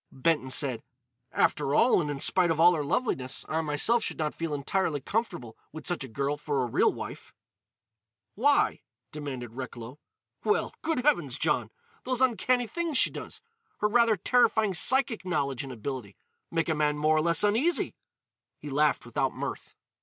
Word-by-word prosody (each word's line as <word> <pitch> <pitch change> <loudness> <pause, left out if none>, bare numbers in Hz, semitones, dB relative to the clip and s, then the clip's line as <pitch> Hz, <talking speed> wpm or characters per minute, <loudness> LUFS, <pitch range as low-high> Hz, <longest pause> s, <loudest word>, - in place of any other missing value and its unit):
Benton 150 -1 0
said: 130 -3 0 0.5
"After 145 -1 +1
all, 235 -6 +4
and 150 - -3
in 145 -1 -4
spite 175 +3 +3
of 160 -1 0
all 175 +2 +7
her 155 -3 -1
loveliness, 135 - -1
I 160 +1 -1
myself 160 +10 +1
should - - -4
not 155 -2 -2
feel 165 -1 -4
entirely 145 +2 -1
comfortable 135 - -3 0.2
with 155 - -9
such 175 -6 -2
a - - -7
girl 140 +5 -2
for 145 -3 -1
a - - -2
real 115 - +2
wife." - - -9 1.0
"Why?" 285 +7 +2 0.3
demanded 130 -6 -6
Recklow. 125 +1 -8 0.4
"Well—good 325 - -1
heavens, 165 - +2
John!—those 150 - -3
uncanny 250 0 +2
things 330 +3 -2
she - - +5
does—her 455 - -6
rather 230 0 +3
terrifying 220 -4 +2
psychic 240 +6 +4
knowledge 140 -8 -2
and 135 - -8
ability—make 130 - -6
a - - +2
man 150 -1 0
more 155 +1 +2
or - - +3
less 170 +2 +2
uneasy." 235 +12 +1 0.6
He 145 - -9
laughed 150 0 +1
without 130 +3 -2
mirth. - - -6
155 Hz, 155 wpm, -28 LUFS, 140-225 Hz, 1.0 s, all